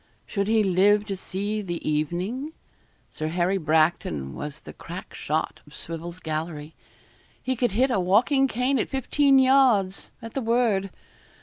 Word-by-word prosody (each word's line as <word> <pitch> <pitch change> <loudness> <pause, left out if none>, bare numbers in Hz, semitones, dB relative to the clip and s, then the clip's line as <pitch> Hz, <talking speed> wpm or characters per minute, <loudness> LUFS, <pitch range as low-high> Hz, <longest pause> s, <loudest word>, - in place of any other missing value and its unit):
Should 200 -1 -2
he 220 0 +3
live 200 +2 +3
to 200 -2 -3
see 200 +3 -3
the 175 -4 -5
evening? 180 - -2 0.6
Sir 155 - -4
Harry 180 +4 0
Bracton 155 - +1
was 150 -1 -7
the - - -11
crack - - -9
shot - - -2
of - - -14
Swivel's 170 +2 -7
gallery. 155 -1 -4 0.7
He 260 - -1
could 240 -4 0
hit 255 +5 +2
a 235 - +2
walking 245 +10 +3
cane 255 +2 0
at - - -1
fifteen 275 +1 +3
yards, 255 -8 +3
at 230 -2 -9
the 270 - -2
word. 225 -4 +1
195 Hz, 150 wpm, -25 LUFS, 170-245 Hz, 0.7 s, he